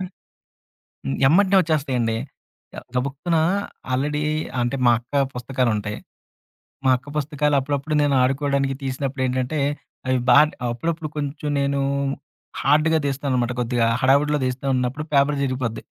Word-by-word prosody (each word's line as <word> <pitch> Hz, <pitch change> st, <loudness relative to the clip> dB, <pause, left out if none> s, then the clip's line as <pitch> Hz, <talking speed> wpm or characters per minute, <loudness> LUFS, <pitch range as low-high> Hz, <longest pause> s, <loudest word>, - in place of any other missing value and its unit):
హ్మ్. 185 Hz, 0 st, -5 dB, 1.2 s
ఎమ్మటనే 195 Hz, +6 st, +4 dB
వచ్చేస్తాయండి. 135 Hz, -8 st, 0 dB, 0.8 s
గబుక్కున 140 Hz, +6 st, -1 dB, 0.6 s
ఆల్రెడీ 150 Hz, +3 st, 0 dB, 0.4 s
అంటే 120 Hz, +2 st, 0 dB
మా -, -, +7 dB
అక్క 140 Hz, +4 st, -1 dB
పుస్తకాలు 125 Hz, 0 st, -1 dB
ఉంటాయి. 105 Hz, 0 st, -4 dB, 0.9 s
మా 130 Hz, -, +4 dB
అక్క 125 Hz, +3 st, -13 dB
పుస్తకాలు 150 Hz, 0 st, 0 dB
అప్పుడప్పుడు 145 Hz, +2 st, -2 dB
నేను 145 Hz, -1 st, +2 dB
ఆడుకోవడానికి 135 Hz, 0 st, +1 dB
తీసినప్పుడు 135 Hz, 0 st, -3 dB
ఏంటంటే, 130 Hz, +4 st, -1 dB, 0.5 s
అవి 130 Hz, 0 st, +2 dB
బాగా 150 Hz, +5 st, +8 dB, 0.3 s
అప్పుడప్పుడు 160 Hz, +5 st, -3 dB
కొంచెం 145 Hz, 0 st, -3 dB
నేను 140 Hz, 0 st, 0 dB, 0.8 s
హార్డ్‌గా 155 Hz, +3 st, +3 dB
తీస్తాననమాట. 130 Hz, -3 st, -1 dB
కొద్దిగా 120 Hz, -1 st, +1 dB, 0.2 s
హడావుడిలో 145 Hz, +3 st, +3 dB
తీస్తా 130 Hz, +2 st, -3 dB
ఉన్నప్పుడు 125 Hz, +4 st, -2 dB
పేపర్ 140 Hz, +1 st, +3 dB
చిరిగిపోద్ది. 130 Hz, -4 st, -2 dB
140 Hz, 115 wpm, -22 LUFS, 125-150 Hz, 1.2 s, బాగా